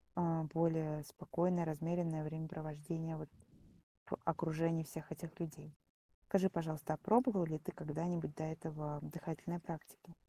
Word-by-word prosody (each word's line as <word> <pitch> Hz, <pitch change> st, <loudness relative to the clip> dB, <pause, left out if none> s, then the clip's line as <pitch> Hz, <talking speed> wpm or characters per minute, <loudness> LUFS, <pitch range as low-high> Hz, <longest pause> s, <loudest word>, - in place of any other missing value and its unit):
а, 165 Hz, -2 st, +3 dB
более 160 Hz, -2 st, +3 dB
спокойное, 170 Hz, +4 st, +1 dB
размеренное 160 Hz, 0 st, +1 dB
времяпровождение, 160 Hz, +1 st, -3 dB
вот, 155 Hz, -2 st, -6 dB, 0.8 s
в -, -, -1 dB
окружении 165 Hz, 0 st, +2 dB
всех 155 Hz, +1 st, -6 dB
этих 165 Hz, 0 st, -7 dB
людей. 155 Hz, -2 st, -5 dB, 0.5 s
Скажи, 190 Hz, -1 st, +5 dB
пожалуйста, 155 Hz, -3 st, -1 dB
а -, -, -2 dB
пробовал 215 Hz, -, +5 dB
ли 155 Hz, -1 st, -1 dB
ты 150 Hz, -, -4 dB
когда-нибудь 165 Hz, 0 st, -1 dB
до 155 Hz, -, -2 dB
этого 155 Hz, -2 st, -3 dB
дыхательные 170 Hz, +1 st, -3 dB
практики? 165 Hz, +1 st, -8 dB
160 Hz, 130 wpm, -39 LUFS, 155-170 Hz, 0.8 s, Скажи